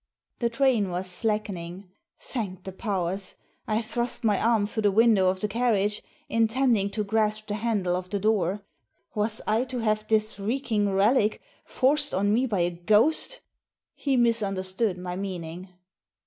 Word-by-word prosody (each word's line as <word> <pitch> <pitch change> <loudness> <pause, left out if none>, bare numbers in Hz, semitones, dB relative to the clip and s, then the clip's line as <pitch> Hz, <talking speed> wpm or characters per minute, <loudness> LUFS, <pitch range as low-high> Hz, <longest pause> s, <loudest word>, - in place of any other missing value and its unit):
The 235 - +1
train 235 -5 +2
was 180 +1 -3
slackening. 185 -2 -3 0.3
Thank 190 -7 -5
the 190 - -6
powers! 190 -1 -3 0.3
I 220 +1 0
thrust 240 +2 -3
my 210 -3 +2
arm 225 -2 +3
through 220 +2 -3
the 205 -1 +3
window 210 -3 +4
of 185 0 -2
the 210 - +1
carriage, 210 -2 +1 0.3
intending 230 -2 +2
to 210 +1 -2
grasp 215 +1 0
the 210 - -4
handle 205 -5 0
of 180 0 -5
the 200 - -1
door. 205 -1 0 0.5
Was 215 +1 +1
I 220 +3 +2
to 255 0 -5
have 215 -2 0
this 215 -2 +1
reeking 215 -1 0
relic 210 +3 +3 0.3
forced 290 +1 +2
on 205 +2 +2
me 250 +4 +2
by 205 -6 0
a 175 +1 +1
ghost! 215 - +2 0.5
He 275 -3 0
misunderstood 200 -4 +1
my 180 0 -5
meaning. 180 -2 -5
210 Hz, 155 wpm, -26 LUFS, 190-230 Hz, 0.5 s, window